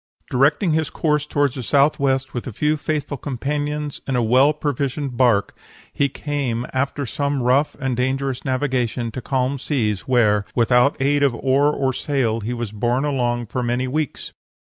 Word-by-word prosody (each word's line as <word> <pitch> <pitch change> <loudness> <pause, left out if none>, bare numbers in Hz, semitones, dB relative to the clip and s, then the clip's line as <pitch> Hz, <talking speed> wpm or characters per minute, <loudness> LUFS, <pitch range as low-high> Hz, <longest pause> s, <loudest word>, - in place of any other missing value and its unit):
Directing 145 +7 +3
his 155 0 0
course 150 -2 0
toward 145 -3 +1
the 130 - -5
southwest, 140 0 +2
with 120 - -4
a - - -4
few 150 +8 +1
faithful 145 -1 -3
companions, 145 +3 -3
in 135 - 0
a 120 - +2
well 130 +6 +5
provisioned 140 -2 -2
bark, 120 -5 +2 0.4
he 140 - +1
came, 135 -5 -3
after 140 +2 -1
some 140 +1 -1
rough 135 +4 +2
and 130 -2 -1
dangerous 130 +1 -1
navigation, 130 -3 -1
to 130 - -6
calm 130 +2 -1
seas, 110 -8 -1
where, 110 -5 +3
without 125 +3 +3
aid 140 +2 +2
of 140 -4 +3
oar 135 +4 +2
or 135 -3 0
sail, 125 -5 0
he 115 +2 -4
was 120 -3 -4
borne 120 +6 0
along 120 -4 0
for 125 +4 -3
many 120 +1 -1
weeks." 150 +3 -3
135 Hz, 165 wpm, -21 LUFS, 120-145 Hz, 0.4 s, well